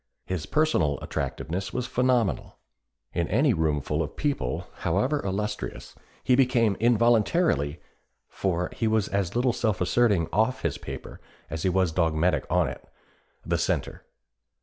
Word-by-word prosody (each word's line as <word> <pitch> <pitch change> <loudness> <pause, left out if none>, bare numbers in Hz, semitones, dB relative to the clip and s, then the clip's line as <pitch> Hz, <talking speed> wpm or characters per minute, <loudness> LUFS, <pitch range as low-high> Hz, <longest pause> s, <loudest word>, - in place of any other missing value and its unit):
His 90 -4 -3
personal 90 - +2
attractiveness 95 +4 -4
was 125 -1 -2
phenomenal. 125 -5 0 0.6
In 85 -1 0
any 130 +5 +3
roomful 75 -2 0
of 75 -1 -4
people, 135 - -2
however 130 - 0
illustrious, 100 -8 -4 0.3
he 130 - +3
became 125 -5 +3
involuntarily 115 - +2 0.5
for 90 -2 -2
he 115 - -1
was 110 -2 +2
as 100 -2 -1
little 125 0 +2
self 110 -5 0
asserting 100 -3 +2
off 110 +7 +1
his 85 -4 -1
paper - - -8 0.3
as 80 - -3
he 95 - +1
was 90 -2 +2
dogmatic 80 +1 +1
on 90 -3 +2
it 60 - -7 0.6
the - - 0
centre. - - -2
100 Hz, 135 wpm, -26 LUFS, 85-120 Hz, 0.6 s, any